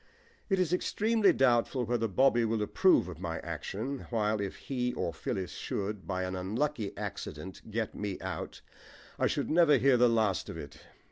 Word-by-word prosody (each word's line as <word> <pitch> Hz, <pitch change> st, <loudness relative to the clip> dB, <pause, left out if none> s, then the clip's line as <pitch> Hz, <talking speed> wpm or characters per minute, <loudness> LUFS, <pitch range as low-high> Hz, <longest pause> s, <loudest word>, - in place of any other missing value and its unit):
It 195 Hz, -, +3 dB
is 180 Hz, -2 st, +1 dB
extremely 215 Hz, +3 st, +3 dB
doubtful 125 Hz, 0 st, +2 dB
whether 115 Hz, 0 st, 0 dB
Bobby 120 Hz, +3 st, +3 dB
will 110 Hz, -1 st, 0 dB
approve 180 Hz, -, +4 dB
of 85 Hz, -3 st, -8 dB
my 85 Hz, -2 st, -3 dB
action, 130 Hz, +7 st, -5 dB
while 110 Hz, -2 st, 0 dB
if 100 Hz, -, -3 dB
he 125 Hz, -2 st, -2 dB
or 85 Hz, -, -2 dB
Phyllis 95 Hz, +3 st, -3 dB
should, 100 Hz, -1 st, -4 dB
by 95 Hz, -1 st, -1 dB
an 90 Hz, 0 st, -3 dB
unlucky 110 Hz, +5 st, -1 dB
accident, 95 Hz, -2 st, -6 dB
get 110 Hz, 0 st, -2 dB
me 100 Hz, -2 st, -4 dB
out, -, -, -5 dB, 0.6 s
I -, -, +3 dB
should -, -, -1 dB
never 160 Hz, -3 st, +6 dB
hear 135 Hz, -1 st, +4 dB
the 120 Hz, 0 st, +5 dB
last 110 Hz, -5 st, +1 dB
of -, -, -6 dB
it. 75 Hz, +1 st, -9 dB
110 Hz, 175 wpm, -31 LUFS, 95-135 Hz, 0.6 s, never